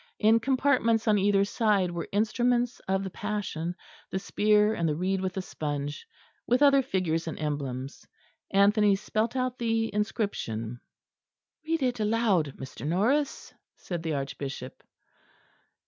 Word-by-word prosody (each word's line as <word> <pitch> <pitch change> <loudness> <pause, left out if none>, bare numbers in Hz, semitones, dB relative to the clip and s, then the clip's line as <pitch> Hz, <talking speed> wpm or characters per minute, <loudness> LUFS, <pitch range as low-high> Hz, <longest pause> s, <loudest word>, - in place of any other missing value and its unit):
In 220 +1 +4
compartments 250 -3 +2
on 210 -1 +4
either 200 0 +3
side 200 -4 +1
were 170 -1 -4
instruments 240 +3 +1
of 190 0 +1
the 190 - -5
Passion, 185 -5 -3 0.3
the - - -2
spear, 210 +2 +3
and 170 -5 0
the 150 - 0
reed 185 +3 -1
with 185 -1 -2
the 190 - -3
sponge, 145 -3 -4 0.4
with 250 +4 +3
other 275 -1 +6
figures 180 -10 -1
and 160 - -4
emblems. 140 -3 -4 0.4
Anthony 200 +1 +4
spelt 215 +4 -2
out 255 -1 -1
the 225 -2 0
inscription. 120 - -2 0.9
"Read 325 -3 0
it 245 -2 0
aloud, 210 - +1
Mr. 130 - -9
Norris," 225 - 0 0.2
said 175 -3 -5
the 160 -2 -2
Archbishop. 135 -1 -5
200 Hz, 135 wpm, -28 LUFS, 165-230 Hz, 0.9 s, other